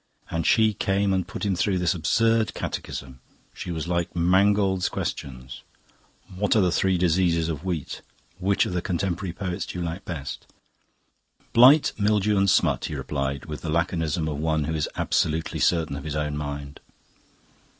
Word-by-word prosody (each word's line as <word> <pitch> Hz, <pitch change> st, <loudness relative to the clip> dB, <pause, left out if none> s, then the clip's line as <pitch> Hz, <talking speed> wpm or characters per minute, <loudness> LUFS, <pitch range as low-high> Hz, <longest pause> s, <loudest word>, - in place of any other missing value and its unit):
And 80 Hz, -1 st, -1 dB
she 110 Hz, -1 st, +4 dB
came 100 Hz, 0 st, +1 dB
and 95 Hz, -2 st, -1 dB
put -, -, -5 dB
him 100 Hz, -2 st, +1 dB
through 95 Hz, +1 st, +1 dB
this 90 Hz, -2 st, +1 dB
absurd 115 Hz, +6 st, +1 dB
catechism! 65 Hz, -1 st, -5 dB, 0.3 s
She -, -, -7 dB
was 80 Hz, -1 st, -3 dB
like 85 Hz, 0 st, -1 dB
"Mangold's 95 Hz, +2 st, +3 dB
Questions": 65 Hz, -2 st, -5 dB, 0.7 s
"What 105 Hz, +3 st, +1 dB
are -, -, +5 dB
the 90 Hz, -2 st, +2 dB
three 95 Hz, +1 st, +2 dB
diseases 85 Hz, -1 st, +2 dB
of 80 Hz, -1 st, -4 dB
wheat?" 85 Hz, -6 st, -4 dB, 0.4 s
"Which 95 Hz, +2 st, +2 dB
of -, -, -4 dB
the 90 Hz, -, 0 dB
contemporary 90 Hz, 0 st, -2 dB
poets 90 Hz, 0 st, -4 dB
do -, -, -6 dB
you 85 Hz, -, -2 dB
like 85 Hz, +4 st, -5 dB
best?" 75 Hz, -6 st, -6 dB, 1.1 s
"Blight, 130 Hz, +6 st, +7 dB
Mildew, 105 Hz, 0 st, +2 dB
and 100 Hz, 0 st, +3 dB
Smut," -, -, +2 dB
he -, -, -4 dB
replied, 70 Hz, -2 st, -3 dB
with 75 Hz, -1 st, -7 dB
the 80 Hz, -, -5 dB
laconism 80 Hz, -1 st, 0 dB
of 75 Hz, -2 st, -3 dB
one 80 Hz, -1 st, 0 dB
who 80 Hz, +2 st, -2 dB
is 75 Hz, -2 st, -1 dB
absolutely 80 Hz, +1 st, 0 dB
certain 80 Hz, -4 st, +1 dB
of 70 Hz, -, -6 dB
his 75 Hz, -1 st, -3 dB
own 75 Hz, -1 st, -1 dB
mind. 70 Hz, -1 st, -5 dB
85 Hz, 170 wpm, -25 LUFS, 75-95 Hz, 1.1 s, Blight